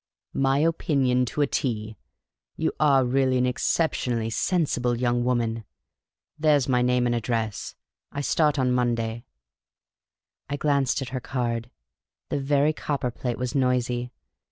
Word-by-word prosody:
" - - -55
My 135 +1 +3
opinion 140 -5 +2
to 145 - -2
a - - +5
T! 110 -6 -2 0.6
You 160 - 0
are 140 -4 +4
really 130 +1 +2
an 125 - +2
exceptionally 125 -3 0
sensible 125 - 0
young 120 0 +1
woman. 115 -2 0 0.8
There 150 -1 +4
's 135 - -2
my 125 -2 +2
name 125 0 +2
and 120 - +1
address; 115 -2 -2 0.4
I 140 - -3
start 150 +1 +2
on 130 -2 +2
Monday." 115 -2 -1 1.2
I 145 - -2
glanced 140 -2 +1
at 130 - -7
her 130 - -3
card. 120 -2 -2 0.6
The - - -1
very 145 +2 +2
copperplate 125 -5 -3
was 125 -1 -3
noisy. 125 -2 0
125 Hz, 140 wpm, -25 LUFS, 120-140 Hz, 1.2 s, a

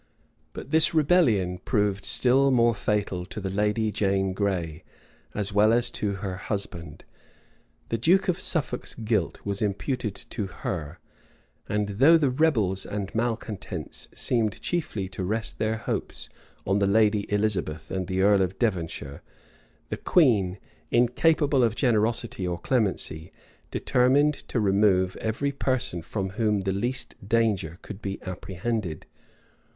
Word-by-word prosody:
But - - -8
this 160 +2 +3
rebellion 120 - +3
proved 100 -2 0
still 135 +2 +3
more 120 -2 +4
fatal 100 -3 -1
to 105 - -6
the 95 -2 -4
lady 105 +2 +1
Jane 95 -2 0
Gray, 90 -6 -2 0.5
as 105 -1 -1
well 105 +2 +5
as 120 +1 +2
to 105 -1 -2
her 95 -1 -4
husband: 85 -6 -5 0.9
the 115 - -1
duke 180 - +3
of 180 0 +1
Suffolk's 145 -7 -1
guilt 110 -6 -1
was 100 -1 -2
imputed 105 +1 -2 0.2
to 105 -5 -3
her; 80 -4 -5 0.7
and 105 0 0
though 135 +12 +5
the 145 -5 +2
rebels 115 - +1
and 100 -2 -5
malecontents 115 -3 -3
seemed 110 -4 0
chiefly 145 - -2
to 95 -1 -5
rest 110 +4 -2
their 110 +1 0
hopes - - -4 0.4
on 100 +1 +2
the 100 - +2
lady 105 0 +2
Elizabeth 100 -7 -1
and 95 -2 -2
the 95 0 0
earl 100 -1 +5
of 95 0 -1
Devonshire, 85 - -2 0.7
the - - -3
queen, 105 - +3 0.3
incapable 135 +3 +3
of 115 -1 +2
generosity 115 -5 0
or 90 -1 -2
clemency, 95 -8 -1 0.4
determined 140 +4 +3
to 120 - -1
remove 95 -2 +3
every 115 +6 -1
person 130 -9 -1
from 95 +4 -3
whom 105 -1 +1
the 95 0 -1
least 120 +6 -2 0.2
danger 105 -8 +1
could 105 -1 -9
be 100 -1 -4
apprehended. 95 -1 -4
105 Hz, 135 wpm, -26 LUFS, 95-120 Hz, 0.9 s, well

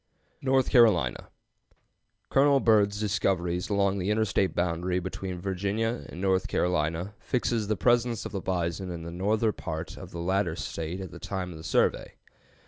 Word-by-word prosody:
NORTH 130 -1 +2
CAROLINA. 110 - +4 1.0
Colonel 140 0 +5
Byrd's 105 -4 +3
discoveries 95 -4 0
along 100 -1 +1
the 95 +2 -1
interstate 105 -3 +1
boundary 90 +1 0
between 95 0 -5
Virginia 100 +5 -2
and 85 - -8
North 95 -1 +1
Carolina 85 +2 0
fixes 120 -4 -1
the 105 -1 0
presence 120 0 +2
of - - -5
the 100 - -3
bison 90 0 -2
in 85 -2 -5
the 85 - -6
northern 105 +5 +1
part - - -5
of - - -9
the - - -8
latter 90 -1 0
State 85 +2 -4
at 95 - -7
the - - -10
date 95 -1 -4
of 85 - -8
the 80 - -10
survey. 80 - +1
95 Hz, 160 wpm, -28 LUFS, 90-110 Hz, 1.0 s, Colonel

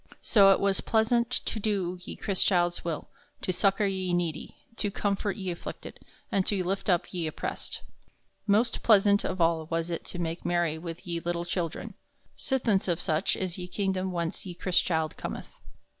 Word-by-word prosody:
So 195 -3 +7
it 195 - +4
was 200 -1 +2
plaisaunt 235 +1 +2
to 240 -2 -2
do 195 -4 -1
ye - - -7
Chrystchilde's 180 -3 +2
will, 165 -3 -3 0.3
to 185 - 0
succor 195 +2 +2
ye 190 -2 0
needy, 170 -3 -2 0.2
to 205 - 0
comfort 200 0 -1
ye 190 -3 -3
afflicted, 170 - -7 0.3
and 195 - +3
to 195 -3 +1
lift 195 +3 -2
up 175 0 +1
ye 170 -3 -1
oppressed. 155 - -5 0.6
Most 220 +4 +3
plaisauntest 205 -2 +5
of 185 - -4
all 165 -1 +2
was 165 +1 -1
it 170 - -3
to - - -6
make 165 -1 -3
merry 175 -3 +1
with 165 +2 -7
ye 170 -1 -2
lyttle 170 0 -2
children, 170 -2 -3 0.4
sithence 230 -8 +1
of 170 -3 +1
soche 155 +4 +1
is 185 -2 -3
ye 180 - -5
kingdom 190 0 -1
whence 170 0 -2
ye 180 -3 -7
Chrystchilde 170 -3 +1
cometh. - - -6
185 Hz, 175 wpm, -28 LUFS, 170-200 Hz, 0.6 s, So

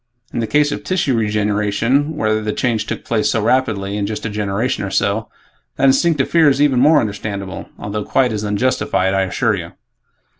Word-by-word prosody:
In - - -2
the 115 - -1
case 145 +4 +2
of 145 - -4
tissue 145 -3 0
regeneration, 105 +6 0
where 110 -6 +1
the 105 0 -2
change 115 -4 -1
took - - -5
place 110 -2 0
so 115 - +1
rapidly, 110 -4 0
in 100 -1 -1
just 110 +1 -5
a 110 - -3
generation 105 +4 -2
or 100 - -3
so, 100 +3 0 0.5
that - - -3
instinctive 135 +1 +3
fear 165 -3 +4
is 135 - +1
even 140 -4 +3
more 150 +3 +5
understandable 100 -4 -5
although 105 +1 -4
quite 125 +2 +1
as 105 0 -3
unjustified, 105 -3 0
I 95 - +2
assure 95 -2 0
you." - - -5
110 Hz, 190 wpm, -18 LUFS, 105-135 Hz, 0.5 s, more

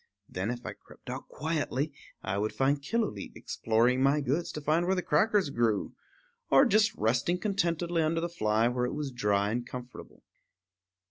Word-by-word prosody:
Then, 95 +4 -3
if 120 0 -5
I - - -4
crept - - -12
out - - -6
quietly, 150 -1 -2 0.3
I 95 +1 -1
would 110 +1 -1
find 140 +2 +1
Killooleet 175 - -2
exploring 120 +3 +1
my 140 +2 +4
goods 145 +5 -1
to - - -4
find 155 +4 +1
where 190 - +2
the 180 - -1
crackers 195 0 +2
grew, 115 -4 0 0.6
or 275 - +6
just 215 -2 +3
resting 120 +10 +1
contentedly 175 -3 0
under 160 +1 +1
the 170 - -1
fly 110 -9 +1
where 125 0 0
it 125 - -3
was 145 -2 -3
dry 105 -4 +1
and 120 +2 -1
comfortable. 125 0 -10
140 Hz, 175 wpm, -29 LUFS, 120-170 Hz, 0.6 s, or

